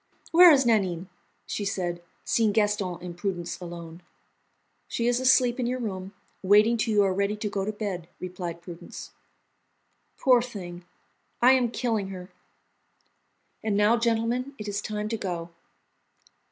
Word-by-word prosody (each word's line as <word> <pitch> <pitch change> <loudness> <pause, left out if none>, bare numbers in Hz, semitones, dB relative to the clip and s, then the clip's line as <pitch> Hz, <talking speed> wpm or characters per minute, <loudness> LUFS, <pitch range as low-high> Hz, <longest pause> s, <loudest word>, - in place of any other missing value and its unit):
"Where 350 +1 +9
is 270 -3 +4
Nanine?" 190 -6 +1 0.4
she 210 - -3
said, 175 -3 -2 0.2
seeing 220 -3 +2
Gaston 205 -4 +1
and 175 -1 -7
Prudence 175 -2 -4
alone. 170 -1 -8 0.9
"She 235 - -2
is 245 0 +2
asleep 255 -1 +4
in 245 - 0
your 250 +1 -1
room, 195 -4 -5 0.3
waiting 210 +4 +5
till 225 0 0
you 205 - +5
are 190 -1 +1
ready 200 +2 0
to 210 0 -3
go 195 -1 -2
to 215 - -1
bed," 195 -5 -5
replied 175 -2 -6
Prudence. 175 0 -9 1.1
"Poor 250 -2 +5
thing, 180 -7 -8 0.5
I 250 +2 +6
am 255 -2 +3
killing 225 -4 -1
her! 185 -1 -9 1.3
And 210 -2 0
now 210 +3 +4
gentlemen, 235 +3 0
it 210 - -7
is 205 0 -2
time 210 0 -3
to 225 - -2
go." 175 -4 -4
205 Hz, 150 wpm, -26 LUFS, 180-235 Hz, 1.3 s, Where